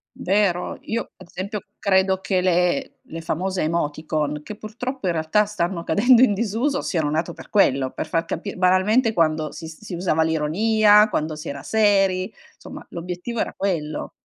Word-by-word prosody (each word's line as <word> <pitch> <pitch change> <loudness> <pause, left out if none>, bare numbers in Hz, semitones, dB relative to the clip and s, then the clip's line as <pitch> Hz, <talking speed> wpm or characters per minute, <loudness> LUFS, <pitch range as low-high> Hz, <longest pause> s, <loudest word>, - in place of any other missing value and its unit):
Vero. 190 -2 0
Io 230 +1 -4
ad 185 - -14
esempio, 200 +3 -5 0.2
credo 190 -1 +2
che 185 0 0
le 180 +8 +1 0.2
le 165 0 -6
famose 185 +4 -2
emoticon, 155 -2 -2
che 210 - -8
purtroppo 220 +2 -5
in 175 - +1
realtà 165 +6 +2
stanno 175 -4 -2
cadendo 240 +7 +4
in 230 -6 +5
disuso, 235 +7 -1
siano 160 -5 -1
nate 160 +2 -1
per - - -13
quello, 135 -10 +3
per - - -5
far 165 0 -1
capi 195 +5 -5
banalmente 190 +6 +3
quando 155 -4 +1
si 160 +1 -8
si 175 +3 -8
usava 170 -3 0
l'ironia, 210 +7 +4
quando 155 -4 -2
si 155 +2 -7
era 140 -1 -6
seri 195 -4 +2 0.3
somma - - -10
l'obiettivo 180 +7 -5
era - - -1
quello. 165 -6 -2
185 Hz, 165 wpm, -22 LUFS, 160-210 Hz, 0.3 s, in